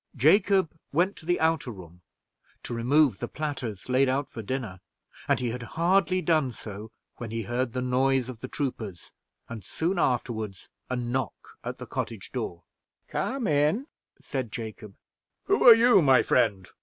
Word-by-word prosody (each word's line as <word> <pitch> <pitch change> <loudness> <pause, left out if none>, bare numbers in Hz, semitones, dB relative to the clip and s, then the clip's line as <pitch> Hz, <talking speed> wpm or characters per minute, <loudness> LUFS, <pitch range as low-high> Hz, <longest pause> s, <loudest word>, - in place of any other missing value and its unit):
Jacob 190 - +4 0.2
went 180 +6 +2
to 160 - -12
the 175 - +2
outer 160 -4 +1
room, 90 -5 -11 0.6
to - - -5
remove 125 0 +3
the - - -3
platters 135 -10 -5
laid 130 +1 +3
out 135 +2 0
for 115 - -8
dinner; 110 -4 -4 0.5
and - - +2
he 125 -2 -1
had 125 +1 -5 0.2
hardly 185 +2 +3
done 155 -6 +2
so 105 -1 -9 0.3
when 120 - -6
he 115 +1 -3
heard 120 +3 -2
the 125 - -2
noise 130 0 +2
of 125 -3 -8
the 130 - -6
troopers, 110 - -5 0.4
and 115 -3 -8
soon 170 - -2
afterward 110 - -1 0.3
a 130 - -1
knock 125 +2 -4
at - - -5
the - - -8
cottage - - -5
door. 85 -1 -4 0.5
"Come 260 -2 -2
in," 155 - +2 0.3
said 130 -6 -4
Jacob. 110 -3 -7 0.5
"Who 400 - +2
are 235 - +12
you, 235 -3 +6
my 135 -4 +5
friend?" 100 -7 +2
130 Hz, 165 wpm, -27 LUFS, 115-155 Hz, 0.6 s, are